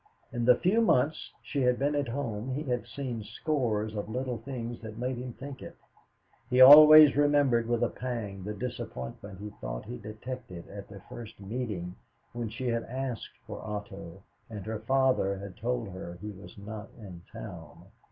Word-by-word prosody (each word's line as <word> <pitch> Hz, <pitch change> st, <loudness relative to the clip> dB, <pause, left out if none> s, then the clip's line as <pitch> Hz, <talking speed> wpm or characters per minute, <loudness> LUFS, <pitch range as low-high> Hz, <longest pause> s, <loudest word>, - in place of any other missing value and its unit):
In 120 Hz, -1 st, -1 dB
the 125 Hz, 0 st, +7 dB
few 200 Hz, -, +2 dB
months 155 Hz, -, +2 dB
she 140 Hz, -, -2 dB
had 125 Hz, -1 st, +3 dB
been 145 Hz, +2 st, +1 dB
at 145 Hz, -1 st, 0 dB
home 120 Hz, -1 st, -3 dB
he 150 Hz, -, -2 dB
had 125 Hz, -4 st, -2 dB
seen 125 Hz, -5 st, -4 dB
scores 110 Hz, -6 st, -1 dB
of 105 Hz, 0 st, -4 dB
little 125 Hz, 0 st, -3 dB
things 120 Hz, -1 st, -6 dB
that 110 Hz, -1 st, -8 dB
made 125 Hz, +1 st, -2 dB
him 125 Hz, 0 st, -6 dB
think 135 Hz, +1 st, -9 dB
it. -, -, -10 dB, 0.7 s
He 125 Hz, -1 st, +2 dB
always 150 Hz, +2 st, +11 dB
remembered 145 Hz, -5 st, +3 dB
with 120 Hz, 0 st, +1 dB
a 120 Hz, -, +2 dB
pang 115 Hz, -6 st, -5 dB
the 105 Hz, +2 st, -4 dB
disappointment 100 Hz, -, -6 dB
he 105 Hz, +1 st, -7 dB
thought -, -, -5 dB
he 60 Hz, -, -6 dB
detected 110 Hz, -4 st, -8 dB
at 100 Hz, 0 st, -8 dB
their 100 Hz, -2 st, -12 dB
first 115 Hz, -3 st, -9 dB
meeting 100 Hz, -4 st, -4 dB, 0.4 s
when 120 Hz, -2 st, -3 dB
she 120 Hz, +4 st, -6 dB
had 115 Hz, -1 st, 0 dB
asked 130 Hz, -3 st, -5 dB
for -, -, -7 dB
Otto, 100 Hz, -3 st, -7 dB, 0.3 s
and 105 Hz, -4 st, -7 dB
her 110 Hz, -1 st, -3 dB
father 130 Hz, -4 st, +2 dB
had 100 Hz, -1 st, -8 dB
told 120 Hz, -1 st, -2 dB
her 90 Hz, -2 st, -7 dB
he 105 Hz, +3 st, -6 dB
was 100 Hz, +1 st, -13 dB
not 105 Hz, +1 st, -8 dB
in 95 Hz, -7 st, -10 dB
town. 85 Hz, -7 st, -10 dB
115 Hz, 180 wpm, -29 LUFS, 105-130 Hz, 0.7 s, always